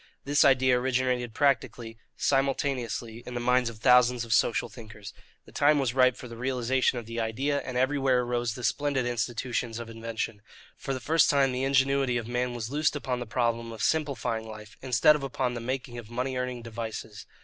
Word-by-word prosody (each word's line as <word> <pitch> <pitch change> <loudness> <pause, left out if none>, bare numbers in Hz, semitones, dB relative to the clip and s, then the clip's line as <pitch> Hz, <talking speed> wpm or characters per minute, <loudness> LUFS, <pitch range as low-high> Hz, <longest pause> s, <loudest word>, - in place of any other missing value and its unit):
This 145 +1 +3
idea 130 -2 +4
originated 125 -2 -1
practically 125 -5 0 0.2
simultaneously 135 -4 -1
in 125 - -8
the - - -1
minds 125 0 +2
of 115 - -10
thousands 125 +1 +4
of 115 - -1
social 115 - +2
thinkers. 105 -3 -11 0.3
The - - -16
time 145 +1 +3
was 130 -4 0
ripe 130 -1 +4
for 125 - -9
the 115 - -9
realization 125 +1 0
of 120 - -5
the 115 +1 -5
idea, 130 +6 -1
and 130 -2 -5
everywhere 130 -1 +2
arose 120 -1 -2
the 125 - -8
splendid 145 -1 0
institutions 120 0 -2
of 120 -1 -7
invention. 115 -2 -5 0.3
For 135 - -4
the - - -4
first 155 +5 +3
time 140 -2 +3
the 125 +1 -2
ingenuity 135 -1 +2
of 115 -2 -4
man 125 0 -2
was 115 0 -5
loosed 150 +1 +1
upon 130 -3 -2
the 120 - -6
problem 115 0 -1
of 110 - -6
simplifying 140 -7 -1
life, 105 -1 -10
instead 130 +3 +4
of 150 - -3
upon 130 -2 -2
the 120 - -5
making 125 0 -4
of 110 -2 -11
money 125 +2 -3
earning 125 -1 -3
devices. 110 -2 -7
125 Hz, 195 wpm, -28 LUFS, 115-135 Hz, 0.3 s, idea